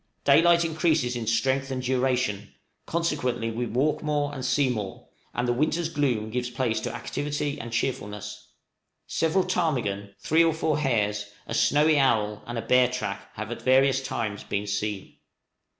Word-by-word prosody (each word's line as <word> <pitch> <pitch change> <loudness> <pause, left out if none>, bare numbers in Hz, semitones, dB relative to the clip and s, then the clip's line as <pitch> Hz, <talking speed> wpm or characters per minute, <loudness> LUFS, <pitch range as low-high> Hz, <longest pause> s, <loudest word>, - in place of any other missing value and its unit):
Daylight 170 0 +5
increases 155 -6 +1
in 115 -2 -4
strength 130 +4 +1
and 130 -1 -3
duration, 125 -5 0 0.3
consequently 145 -9 -1
we 120 +2 -2
walk 135 +7 0
more, 145 -1 -1
and 130 -2 -6
see 135 +2 +2
more, 105 -6 -4 0.3
and 125 - 0
the 120 - +2
winter's 155 +5 0
gloom 125 -9 0
gives 125 +1 -2
place 120 -3 -1
to - - -4
activity 145 0 -3
and 115 0 -7
cheerfulness. 105 -4 -3 0.6
Several 175 +4 +1
ptarmigan, 125 - -1
three 160 +2 +3
or 165 -1 +2
four 155 -2 0
hares, 105 -7 0 0.2
a - - -5
snowy 150 +1 +4
owl, 110 -6 +2
and 120 0 -4
a 115 - -3
bear 125 0 +4
track, 100 -6 -4
have 110 +2 -5
at 120 - -5
various 135 +1 +4
times 110 -6 -3
been 105 0 -2
seen. 105 -1 -3
125 Hz, 160 wpm, -26 LUFS, 110-145 Hz, 0.6 s, Daylight